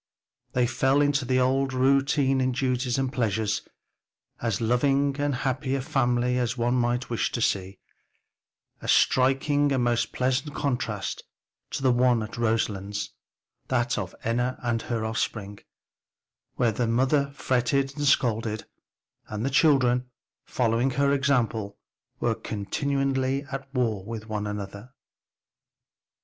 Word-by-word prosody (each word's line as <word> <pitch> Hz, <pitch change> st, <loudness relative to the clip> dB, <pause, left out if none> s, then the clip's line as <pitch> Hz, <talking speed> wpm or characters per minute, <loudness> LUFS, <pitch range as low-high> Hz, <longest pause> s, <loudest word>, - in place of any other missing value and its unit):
They 125 Hz, -1 st, +3 dB
fell 135 Hz, +3 st, +2 dB
into 145 Hz, -2 st, +2 dB
the 130 Hz, +1 st, +2 dB
old 135 Hz, +1 st, +1 dB
round 135 Hz, +2 st, +3 dB
of 130 Hz, -2 st, +2 dB
duties 125 Hz, -1 st, 0 dB
and 135 Hz, 0 st, -1 dB
pleasures, 110 Hz, -3 st, 0 dB, 0.8 s
as 115 Hz, -4 st, -1 dB
loving 135 Hz, +4 st, +2 dB
and 145 Hz, -1 st, 0 dB
happy 130 Hz, +1 st, -1 dB
a 135 Hz, -, -1 dB
family 125 Hz, -4 st, +1 dB
as 120 Hz, 0 st, -1 dB
one 120 Hz, +1 st, +1 dB
might 120 Hz, 0 st, 0 dB
wish 115 Hz, -, 0 dB
to -, -, -1 dB
see; 95 Hz, -3 st, -1 dB, 1.0 s
a -, -, -7 dB
striking 140 Hz, +2 st, +3 dB
and 130 Hz, -2 st, +1 dB
most 120 Hz, -1 st, +1 dB
pleasant 130 Hz, +3 st, -1 dB
contrast 120 Hz, -7 st, -2 dB, 0.5 s
to -, -, -4 dB
the 130 Hz, -, +5 dB
one 120 Hz, -2 st, +3 dB
at 110 Hz, -, -7 dB
Roselands, 105 Hz, -3 st, -1 dB, 0.6 s
that 120 Hz, -1 st, +1 dB
of 95 Hz, -2 st, -5 dB
Enna 120 Hz, +3 st, 0 dB
and 120 Hz, -1 st, 0 dB
her 115 Hz, -1 st, -2 dB
offspring 110 Hz, -2 st, -3 dB, 1.0 s
where 120 Hz, -2 st, +2 dB
the 115 Hz, +2 st, -1 dB
mother 135 Hz, +4 st, +2 dB
fretted 135 Hz, +2 st, 0 dB
and 145 Hz, -1 st, -1 dB
scolded, 110 Hz, -4 st, +1 dB, 0.6 s
and 110 Hz, +2 st, -4 dB
the 135 Hz, -, 0 dB
children, 130 Hz, -4 st, +3 dB, 0.4 s
following 120 Hz, +1 st, +1 dB
her 140 Hz, +2 st, +2 dB
example 120 Hz, -7 st, 0 dB, 0.4 s
were 120 Hz, -1 st, +1 dB
continually 135 Hz, +5 st, -1 dB
at 135 Hz, 0 st, -6 dB
war 115 Hz, -7 st, 0 dB
with 110 Hz, +1 st, -7 dB
one 105 Hz, -1 st, -3 dB
another. 105 Hz, +3 st, -6 dB
125 Hz, 135 wpm, -26 LUFS, 115-135 Hz, 1.0 s, the